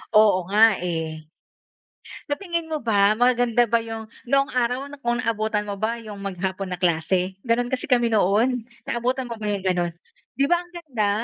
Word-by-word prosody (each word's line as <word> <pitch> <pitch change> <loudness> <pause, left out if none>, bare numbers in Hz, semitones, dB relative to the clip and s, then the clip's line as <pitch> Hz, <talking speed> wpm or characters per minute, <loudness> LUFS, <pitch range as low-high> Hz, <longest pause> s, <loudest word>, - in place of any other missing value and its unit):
Oo 205 -4 +5
nga, 215 0 +5
eh. 160 -3 -3 1.1
Sa 290 - +1
tingin 340 -4 -3
mo 310 - 0
ba, 210 -4 +3
maganda 245 -1 +3
ba 230 +1 +3
yung 225 -1 -6 0.2
noong 275 +1 +3
araw, 250 +2 0 0.2
kung 240 0 +1
naabutan 215 -2 -1
mo 200 - -3
ba 220 +4 -1
yung 210 -3 -9
maghapon 190 0 -3
na 180 - -4
klase? 180 +2 +1
Ganun 245 0 +1
kasi 260 - -2
kami 240 -2 +4
noon. 220 +5 +2 0.2
Naabutan 250 +2 -1
mo 235 - -5
ba - - -3
yung 200 -2 -2
ganun? 175 -2 +1 0.5
Di 275 - +3
ba 345 +1 +3
ang 350 - -17
ganda? 255 -12 -2
225 Hz, 175 wpm, -24 LUFS, 195-245 Hz, 1.1 s, Oo